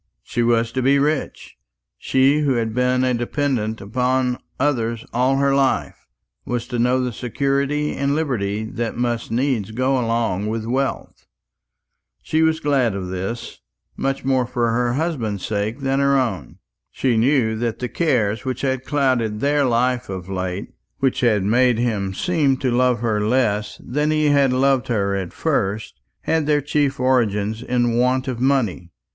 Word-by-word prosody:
She 120 - -2
was 115 -1 +2
to 130 - -1
be 135 +2 +4
rich. 145 - -2 0.4
She 135 +3 +3
who 145 -3 +2
had 115 -2 -1
been 125 +1 +1
a 130 -1 +2
dependant 120 -3 -1
upon 125 +4 0 0.2
others 115 -5 0
all 125 +3 +2
her 140 0 +2
life 135 -1 0 0.4
was 120 -1 -3
to 120 -2 -2
know 125 +2 +2
the 125 -1 -2
security 140 +5 -1
and 140 +1 0
liberty 110 -9 -1
that 115 +1 -4
must 120 -1 -1
needs 120 -3 0
go 130 +4 0
along 115 -4 -1
with 110 0 -3
wealth. 130 +3 -3 1.0
She 160 - 0
was 160 0 +2
glad 135 -8 +1
of 95 -2 -4
this, 95 +6 -5 0.4
much 135 -1 -2
more 130 -2 +1
for 120 -2 0
her 120 +1 +1
husband's 125 - -2
sake 110 +5 -2
than 135 0 0
her 140 0 +3
own. 105 - -2 0.3
She 130 -3 0
knew 115 -1 +2
that 115 0 -2
the 125 - -3
cares 115 -10 0
which 130 -1 -3
had 130 -2 -1
clouded 130 -7 0
their 145 +2 +2
life 125 0 +1
of 95 -2 -6
late, 95 0 -4 0.3
which 135 -2 0
had 110 -5 +2
made 120 +3 +3
him 105 -5 -1
seem 150 - +1
to 130 -1 -1
love 125 -2 +2
her 110 -3 0
less 105 -3 0
than 150 +4 0
he 155 -1 +2
had 140 -2 +4
loved 130 0 +2
her 100 -5 0
at 95 -3 -4
first, 100 -9 -2 0.2
had 160 -2 0
their 150 -1 +3
chief 145 -1 0
origin 110 -5 +1 0.2
in 120 -1 +1
want 130 +2 +1
of 125 -3 -3
money. 120 -10 0
125 Hz, 165 wpm, -21 LUFS, 110-135 Hz, 1.0 s, be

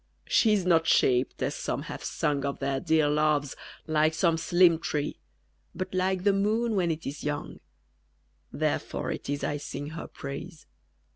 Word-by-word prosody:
_ - - -42 0.2
She 220 - +4
is 195 -4 +1
not 165 -2 +3
shaped, 125 0 +2
as - - 0
some - - -3
have - - -7
sung 140 -2 -1
Of 140 0 -2
their 135 -1 -1
dear 160 -1 +2
loves, 150 -2 +1 0.3
like 155 0 +2
some 165 0 +3
slim 170 0 +4
tree, 150 -3 -2 0.6
But 185 0 -4
like 185 0 0
the 200 0 +4
moon 220 +4 +1
when 180 -3 +1
it 160 0 -3
is 145 +2 -5
young: 145 0 -4 0.9
_Therefore - - -2
it - - -8
is 145 0 -2
I 145 - -1
sing 145 0 -6
her 165 - -6
praise. 150 +4 -8
160 Hz, 170 wpm, -28 LUFS, 145-180 Hz, 0.9 s, She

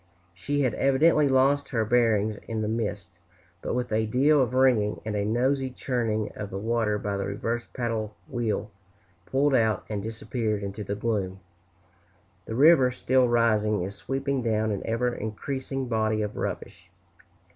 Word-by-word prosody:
She 145 +12 -2
had 125 -5 +1
evidently 145 +4 +3
lost 135 +2 +3
her 115 -4 0
bearings 110 -2 +2
in 110 -1 -2
the - - -1
mist; 100 -5 -4 0.4
but - - -3
with 125 -1 -2
a 110 0 +1
deal 140 +6 +4
of 125 0 0
ringing, 125 -6 +3
and 110 -1 -3
a 100 - 0
noisy 130 +5 +1
churning 115 -5 -2
of 100 - -6
the 95 - -5
water 110 0 0
by 100 -1 -3
the 100 - -2
reversed 115 +4 -3
paddle 115 -4 -3
wheel, 110 -3 -2 0.6
pulled 140 +1 +2
out 110 -5 +2
and 105 -2 -3
disappeared 110 -1 -3
into 100 +2 -5
the 100 +1 -3
gloom. 100 -4 -2 1.1
The 110 - -4
river, 140 -1 +6
still 130 0 +2
rising, 110 -4 +2
is 95 +2 -5
sweeping 135 +5 -2
down 110 -2 0
an 100 - -2
ever 120 +2 0
increasing 130 +5 -4
body 110 -2 0
of 105 0 -4
rubbish. - - -5
115 Hz, 160 wpm, -26 LUFS, 105-130 Hz, 1.1 s, river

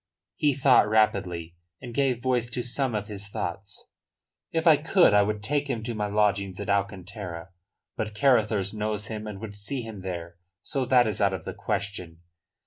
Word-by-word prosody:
He 145 -3 +2
thought 130 -5 +5
rapidly, 90 -6 +1 0.2
and 120 -2 -8
gave 130 -3 +1
voice 125 -2 +1
to 120 0 -2
some 125 0 -1
of 105 -1 -2
his 100 -1 -6
thoughts. 100 0 -6 0.7
"If 165 0 -1
I 160 -2 +8
could 165 - +4
I 105 - +6
would 105 0 -1
take 145 +5 0
him 115 -4 -2
to 120 +1 -3
my 105 -2 -2
lodgings 100 -2 +1
at 100 0 -2
Alcantara. 95 -3 -3 0.5
But 110 -1 -4
Carruthers 110 -6 +2
knows 105 -1 -3
him 110 -1 -5
and 105 -2 -6
would 105 -1 -7
see 105 +6 -4
him 110 -4 -8
there. 85 -2 -6 0.3
So 135 -3 -1
that 125 -1 +5
is 105 -3 -2
out 100 -1 +3
of 90 -4 -5
the - - -4
question. 95 -5 -4
105 Hz, 185 wpm, -27 LUFS, 100-120 Hz, 0.7 s, I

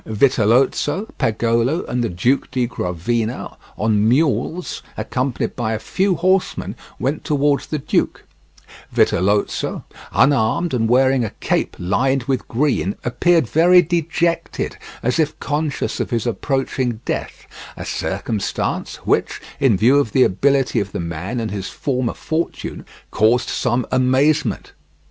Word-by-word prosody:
Vitellozzo, 130 - +2
Pagolo, 115 +7 +1
and 125 0 -1
the 115 - 0
Duke 120 +11 0
di 125 -2 0
Gravina 115 +2 -3 0.2
on 110 0 +2
mules, 145 +5 0 0.2
accompanied 130 0 -2
by 110 -3 -1
a - - -1
few 190 - 0
horsemen, 185 +2 0 0.2
went 140 +4 -2
towards 145 -1 +1
the 155 - -2
duke; 140 - -1 0.7
Vitellozo, 100 +3 +1 0.3
unarmed 140 +5 +2
and 115 -3 +1
wearing 130 +1 +4
a 110 - -2
cape - - 0
lined 125 +9 +1
with 130 0 -2
green, 120 -6 0
appeared 160 +6 +3
very 175 +8 +5
dejected, 170 0 -1 0.3
as 125 +7 +1
if 155 0 0
conscious 150 -1 -2
of - - -2
his 115 -3 -1
approaching 125 -1 -1
death—a - - -6
circumstance 110 -4 -2
which, - - +1 0.2
in 130 -8 +3
view 125 +8 +5
of 115 -7 -1
the 130 - +5
ability 135 +4 +2
of 100 -1 -4
the - - -3
man 85 +8 -4
and 110 -3 -3
his 100 -2 -4
former 130 -4 -2
fortune, 160 +1 -4 0.2
caused 115 +3 +2
some 120 0 0
amazement. 130 +4 +2
130 Hz, 130 wpm, -20 LUFS, 110-145 Hz, 0.7 s, very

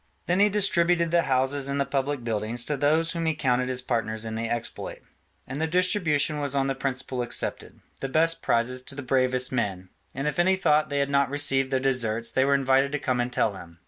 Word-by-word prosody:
Then 180 +2 +1
he 205 +1 +5
distributed 175 -4 +2
the 170 0 +4
houses 135 +1 +1
and 140 0 -1
the 140 - +1
public 135 -1 -2
buildings 115 +1 -1
to 150 - -1
those 155 +4 +2
whom 165 -2 -2
he 160 - +1
counted 125 -3 0
his 125 0 -1
partners 115 -3 -2
in 110 - -5
the 115 +1 -3
exploit; 120 -1 -5 0.4
and 135 +4 -5
the 160 - +1
distribution 165 -4 +2
was 140 -1 -1
on 135 -1 +1
the 135 - 0
principle 130 -1 -3
accepted, 120 -1 -3 0.2
the 135 - -4
best 165 +3 +2
prizes 125 +2 0
to 140 - -8
the 145 - -6
bravest 130 0 +1
men: 95 -7 -2 0.3
and 135 +2 -2
if 150 +2 -2
any 190 +2 +4
thought 155 -4 +2
they 145 - -2
had 140 0 0
not 140 -1 +2
received 135 -2 +1
their 130 - +1
deserts 115 -4 0
they 130 - +2
were 140 +1 +3
invited 135 0 +2
to - - +1
come 130 -3 -1
and 120 0 -1
tell 110 -4 +1
him. 85 -3 -12
135 Hz, 225 wpm, -26 LUFS, 125-150 Hz, 0.4 s, he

